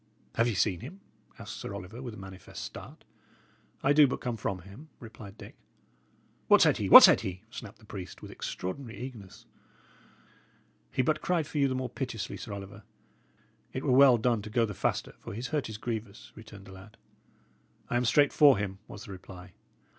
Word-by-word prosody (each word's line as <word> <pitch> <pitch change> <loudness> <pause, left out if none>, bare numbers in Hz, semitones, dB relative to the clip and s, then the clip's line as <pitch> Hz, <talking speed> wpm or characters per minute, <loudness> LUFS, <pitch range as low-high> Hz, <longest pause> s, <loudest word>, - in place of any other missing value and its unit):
"Have 115 - +2
ye 115 - -1
seen 95 -2 +1
him?" 155 - -10 0.4
asked - - -8
Sir 100 - -6
Oliver, 100 +5 -8
with 120 -4 -7
a - - -12
manifest 95 -1 -9
start. - - -10 0.8
"I 140 - +4
do 145 -1 +7
but 130 - -3
come 120 -2 -3
from 95 -5 -4
him," 110 - -13
replied 110 -3 -11
Dick. - - -11 0.9
"What - - +7
said - - +4
he? - - -2
what - - +12
said - - +7
he?" 95 -2 -6
snapped 110 -4 -9
the 110 - -20
priest, 95 -3 -8
with - - -10
extraordinary 115 +6 -6
eagerness. 120 -7 -9 1.4
"He 130 - 0
but 155 +3 0
cried 175 -4 0
for 150 - -4
you 140 - +4
the 130 - -2
more 130 0 -2
piteously, 120 -3 -5
Sir - - -8
Oliver. 100 +1 -8 0.9
It 130 - -4
were 135 - +1
well 130 -1 +7
done 115 -1 +1
to 110 - -8
go 115 +1 +2
the 105 - -6
faster, - - -2
for - - -8
his 120 +3 -5
hurt 150 -7 -2
is 110 - -6
grievous," 110 -2 -6
returned 105 -3 -13
the 100 - -12
lad. 95 +3 -14 0.9
"I - - -3
am 120 +1 +1
straight 145 +5 +4
for 145 -5 +6
him," 95 -1 -4
was 105 - -10
the - - -10
reply. 90 -1 -11
110 Hz, 195 wpm, -29 LUFS, 100-130 Hz, 1.4 s, what